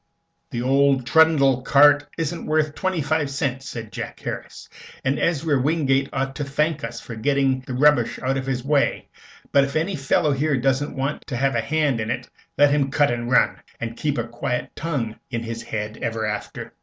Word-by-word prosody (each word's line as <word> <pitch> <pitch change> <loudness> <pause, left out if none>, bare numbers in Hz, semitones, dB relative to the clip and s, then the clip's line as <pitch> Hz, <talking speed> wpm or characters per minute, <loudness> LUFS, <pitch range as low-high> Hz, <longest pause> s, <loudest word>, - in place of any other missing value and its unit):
"The 120 0 -3
old 135 0 +3
trundle 140 -3 +4
cart 145 +2 +5
isn't 165 +1 -3
worth 155 -1 +1
twenty 185 -3 -1
five 150 0 0
cents," 135 -1 -3
said 110 -3 -7
Jack - - -6
Harris, - - -7 0.4
"and 135 +2 +1
Ezra 155 -4 +1
Wingate 140 -2 +1
ought 135 0 -2
to 145 - -2
thank 150 +2 -1
us 115 0 -5
for 115 - -9
getting 135 +2 +1
the 125 - -4
rubbish 135 -3 +3
out 130 +1 -1
of 135 -1 -2
the 130 -2 -2
way. 145 -1 +1 0.4
But 140 - +5
if 140 0 -4
any 170 +5 0
fellow 145 +1 +1
here 140 +1 +1
doesn't 135 +3 0
want 135 +3 -3
to 125 - -3
have 135 +2 +1
a 115 - +1
hand 145 0 0
in 110 - -3
it, - - -3 0.3
let 145 0 +5
him 140 -2 +2
cut 145 -1 +2
and 120 0 -3
run, 130 - +3 0.2
and 115 0 -4
keep 145 +3 -1
a 120 - 0
quiet 125 +2 -3
tongue 140 -9 -3
in 115 -2 -3
his 115 0 -5
head 110 0 -5
ever 110 -1 -2
after." 105 0 -5
135 Hz, 195 wpm, -23 LUFS, 125-150 Hz, 0.4 s, cart